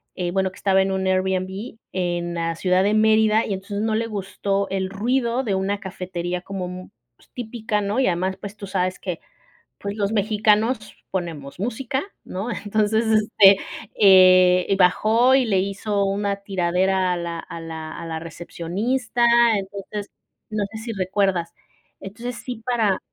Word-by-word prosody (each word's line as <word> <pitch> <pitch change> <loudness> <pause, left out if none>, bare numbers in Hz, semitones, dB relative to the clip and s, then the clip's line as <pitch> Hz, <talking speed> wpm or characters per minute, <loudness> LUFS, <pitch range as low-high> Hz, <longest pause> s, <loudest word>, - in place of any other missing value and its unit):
eh, 175 -2 -2
bueno, 190 0 0
que 185 - -17
estaba 190 -1 +3
en 195 - 0
un 190 0 -1
Airbnb, 190 +3 -1
en 175 -2 -2
la 165 0 -1
ciudad 185 +2 +2
de 205 +2 +2
Mérida 220 0 +4
y 200 - -2
entonces, 200 +2 -4
no 220 0 0
le 230 +1 0
gustó 200 -1 -2
el 190 -1 -2
ruido 235 +5 0
de 210 -6 -1
una 195 +2 -1
cafetería 180 -2 -4
como, 190 -1 -5
mm, 180 0 -8 0.3
pues, - - -25
típica, 220 -3 -3
¿no? 205 +5 -1
Y 265 - +3
además, 185 +2 -1
pues 205 +1 -9
tú 200 - -7
sabes 185 -1 -1
que 180 -3 -4 0.6
pues, 200 +1 -4
los 205 0 -1
mexicanos 215 +2 +1 0.2
ponemos 165 -6 -5
música, 245 +5 -2 0.2
¿no? 195 +6 -5
Entonces, 215 +1 0
este, 215 -2 +5 0.4
eh, 185 -1 +6
bajó 220 +7 +4
y 260 -3 +4
le 195 -3 +2
hizo 200 +1 -1
una 200 0 -1
tiradera 185 -1 0
a - - -4
la 170 -1 -4
a 170 0 -8
la 160 -1 -7
a - - -6
la 160 -1 -4
recepcionista, 195 - -2 0.3
entonces, 200 +1 -6 0.4
no 215 -1 -1
sé 220 - -8
si 225 +1 -5
recuerdas. 190 -3 0 0.4
Entonces 235 +5 -7
sí, 235 -1 -7
para 225 -6 +1
195 Hz, 165 wpm, -22 LUFS, 185-215 Hz, 0.6 s, eh